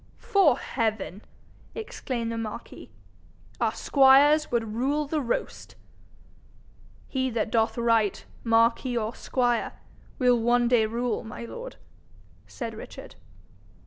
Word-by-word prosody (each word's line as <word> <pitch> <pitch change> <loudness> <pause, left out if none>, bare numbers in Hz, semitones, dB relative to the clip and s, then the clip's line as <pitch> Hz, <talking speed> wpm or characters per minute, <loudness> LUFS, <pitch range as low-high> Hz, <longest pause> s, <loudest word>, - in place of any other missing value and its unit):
''Fore 360 -11 +3
heaven!' 220 -4 -3 0.5
exclaimed 255 - -4
the 230 - -4
marquis, 220 -2 -7 0.7
'our - - +2
squires 285 +3 +5
would 225 -3 -1
rule 280 +6 0
the 300 +1 -1
roast.' 240 -3 -4 1.3
'He 260 -1 -1
that 225 -2 -2
doth 225 0 +1
right, 230 -3 +1 0.2
marquis 230 +2 +2
or 220 0 -2
squire, 245 -3 -1 0.4
will 250 -3 +3
one 240 +1 +2
day 235 -3 +3
rule, 240 +2 -2
my 215 - -8
lord,' 115 - -8 0.7
said 100 -1 -6
Richard. - - -10
235 Hz, 115 wpm, -26 LUFS, 225-260 Hz, 1.3 s, squires